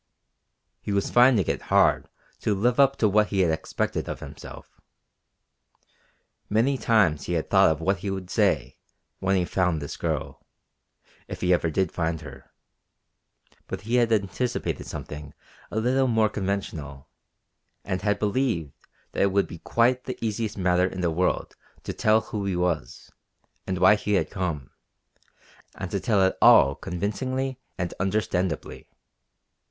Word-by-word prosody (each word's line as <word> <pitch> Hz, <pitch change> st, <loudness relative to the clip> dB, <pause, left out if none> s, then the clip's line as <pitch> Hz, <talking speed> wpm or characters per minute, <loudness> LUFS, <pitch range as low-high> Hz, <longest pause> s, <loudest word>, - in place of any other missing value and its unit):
He -, -, -4 dB
was 100 Hz, -1 st, 0 dB
finding 120 Hz, -6 st, +5 dB
it -, -, -2 dB
hard -, -, +2 dB, 0.3 s
to 105 Hz, -, 0 dB
live 120 Hz, +6 st, +1 dB
up 140 Hz, 0 st, +5 dB
to 110 Hz, -, +2 dB
what 105 Hz, +1 st, +3 dB
he 100 Hz, -2 st, 0 dB
had 85 Hz, -3 st, +3 dB
expected 80 Hz, 0 st, -2 dB
of -, -, -5 dB
himself. -, -, -11 dB, 1.7 s
Many 115 Hz, +6 st, +2 dB
times 105 Hz, -, +2 dB
he 90 Hz, -, -3 dB
had 80 Hz, -2 st, -2 dB
thought 95 Hz, -1 st, +6 dB
of 80 Hz, 0 st, -1 dB
what 95 Hz, +3 st, +1 dB
he 100 Hz, -, -4 dB
would 95 Hz, -2 st, -5 dB
say -, -, +1 dB, 0.4 s
when 95 Hz, +1 st, +1 dB
he 90 Hz, -2 st, +1 dB
found 90 Hz, -3 st, 0 dB
this 70 Hz, -1 st, -6 dB
girl, -, -, -3 dB, 0.8 s
if -, -, -7 dB
he 90 Hz, 0 st, +3 dB
ever 85 Hz, -1 st, +1 dB
did 90 Hz, +2 st, 0 dB
find 80 Hz, -1 st, -2 dB
her; 70 Hz, -3 st, -12 dB, 1.2 s
but -, -, -5 dB
he 115 Hz, +4 st, 0 dB
had 120 Hz, -2 st, +2 dB
anticipated 110 Hz, +4 st, -1 dB
something 75 Hz, -1 st, -8 dB, 0.3 s
a 110 Hz, -, -2 dB
little 130 Hz, +3 st, +2 dB
more 110 Hz, -3 st, +2 dB
conventional, 85 Hz, -9 st, -4 dB, 0.8 s
and 95 Hz, -2 st, -2 dB
had 105 Hz, 0 st, +1 dB
believed 105 Hz, -, -1 dB, 0.4 s
that -, -, -2 dB
it 100 Hz, -, +3 dB
would 100 Hz, +1 st, +2 dB
be 85 Hz, -, -10 dB
quite 125 Hz, +6 st, +1 dB
the 130 Hz, -, -5 dB
easiest 110 Hz, -1 st, -3 dB
matter 90 Hz, -1 st, +2 dB
in 95 Hz, 0 st, -5 dB
the 85 Hz, -2 st, +1 dB
world 90 Hz, +3 st, -1 dB, 0.3 s
to -, -, -4 dB
tell 110 Hz, +1 st, +3 dB
who 105 Hz, -2 st, -5 dB
he 95 Hz, -2 st, -1 dB
was, 90 Hz, -3 st, -2 dB, 0.6 s
and 95 Hz, -, -1 dB
why 95 Hz, +3 st, +6 dB
he 105 Hz, 0 st, -1 dB
had -, -, 0 dB
come, 80 Hz, -9 st, -3 dB, 1.0 s
and 95 Hz, -2 st, -6 dB
to 100 Hz, -, -1 dB
tell 100 Hz, -1 st, +2 dB
it 95 Hz, -, +2 dB
all 70 Hz, -, +7 dB
convincingly 130 Hz, -, -3 dB, 0.2 s
and 90 Hz, -1 st, -3 dB
understandably. 95 Hz, -4 st, -2 dB
95 Hz, 155 wpm, -25 LUFS, 90-110 Hz, 1.7 s, all